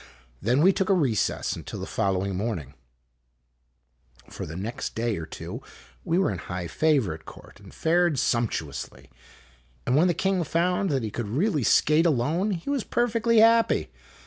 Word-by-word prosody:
Then 125 - +2
we 190 +2 +6
took 190 +1 -1
a 195 - +5
recess 130 - 0
until - - -7
the - - -4
following 95 0 -1
morning. 90 - -3 1.5
IMAGINOTIONS - - -16
For - - -5
the 80 - -7
next 115 +9 -5
day 115 -1 -1
or 80 - -6
two - - -7 0.4
we 165 - 0
were 190 - +2
in - - -5
high 90 -1 -5
favor 135 - +1
at 80 0 -12
court - - -14
and - - -14
fared 170 -2 +1
sumptuously; 105 - -2 0.7
and 125 - +1
when 160 +5 +4
the 175 - +1
king 190 -2 0
found 180 +4 0
that 135 -5 0
he 110 - -3
could 120 -1 -4
really 150 - 0
skate 155 +8 +4
alone 160 - +1
he 180 0 -4
was 275 -5 0
perfectly 230 -1 +2
happy. 230 0 +3
150 Hz, 170 wpm, -26 LUFS, -, 1.5 s, we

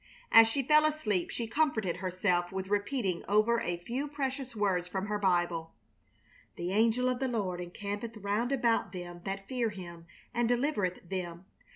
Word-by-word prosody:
As 225 0 +9
she 270 +5 0
fell 305 +3 +5
asleep 235 - 0
she 235 - -3
comforted 225 - 0
herself 180 -1 0
with 190 0 -4
repeating 205 -3 0
over 215 +4 +3
a 175 0 -1
few 245 +11 -3
precious 270 -3 -3
words 190 -4 +1
from 190 +1 -3
her 210 0 -2
Bible: 175 -4 0 0.8
"The 175 +1 -3
angel 230 +4 +3
of 255 -1 0
the 265 - 0
Lord 195 -7 -2
encampeth 205 +5 -5
round 210 +5 -1
about 235 -7 +1
them 175 -1 -7
that 195 0 -4
fear 245 -3 0
Him 170 -4 -9 0.3
and 240 -1 +1
delivereth 240 - 0
them. 175 -1 -5
205 Hz, 165 wpm, -31 LUFS, 180-240 Hz, 0.8 s, As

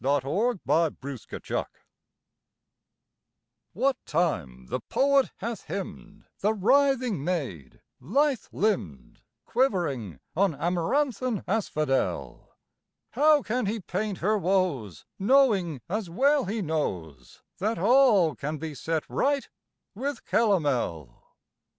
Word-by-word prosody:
POETRY 145 - +1
EVERYWHERE 140 -6 -1 2.1
WHAT 260 +6 +1
time 85 - -1
the - - -3
poet 275 -1 +2
hath 225 0 -5
hymned 200 +1 -7
The 215 +2 +1
writhing 250 - +2
maid, 135 - -4 0.2
lithe 270 - +1
limbed, 95 - -2 0.2
Quivering 155 - 0 0.2
on 190 -2 +2
amaranthine 215 - 0
asphodel, 155 -10 -1 0.6
How 300 -1 +4
can 240 0 -1
he 220 +3 -1
paint 195 +1 -3
her 210 +5 +1
woes, 175 - 0
Knowing, 200 - +3
as 200 0 -3
well 275 - +3
he 210 +2 -2
knows, 85 - -4 0.2
That 215 +4 0
all 210 - +5
can 150 +2 -4
be 155 +1 -5
set 160 +3 -2
right 280 0 0 0.5
with 265 +4 -4
calomel? 140 - 0
190 Hz, 100 wpm, -27 LUFS, 150-235 Hz, 2.1 s, all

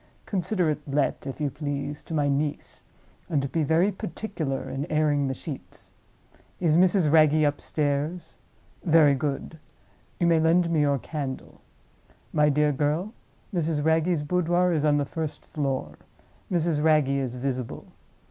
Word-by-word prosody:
Consider 185 -3 0
it 150 - -4
let, 140 0 -1
if 135 - -6
you 145 -2 -1
please, 145 0 -4
to 165 - -4
my 145 -2 +2
niece—and 145 0 -3
be 165 - 0
very 160 +7 +3
particular 165 -7 -4
in 140 +3 -4
airing 150 -2 +2
the 130 - -2
sheets? 140 +1 -8 0.7
Is 165 -4 +3
Mrs. 180 -3 +4
Wragge 155 -1 +5
upstairs? 145 +3 -1 0.4
Very 160 -4 +5
good. 145 +3 -3 0.6
You 175 - +2
may 165 -1 +4
lend 170 +2 +3
me 160 - +2
your 140 -1 +2
candle. 135 -1 -6 0.7
My 150 0 +4
dear 150 +1 +3
girl, 150 - -1 0.4
Mrs. 160 -4 0
Wragge's 160 0 +2
boudoir 180 +2 +2
is 155 -2 +1
on 145 -1 +4
the 145 - 0
first 155 0 -5
floor; 135 -3 -3 0.5
Mrs. 165 -4 +1
Wragge 155 -3 +4
is 135 -3 -1
visible. 125 -1 -4
150 Hz, 140 wpm, -26 LUFS, 145-165 Hz, 0.7 s, Wragge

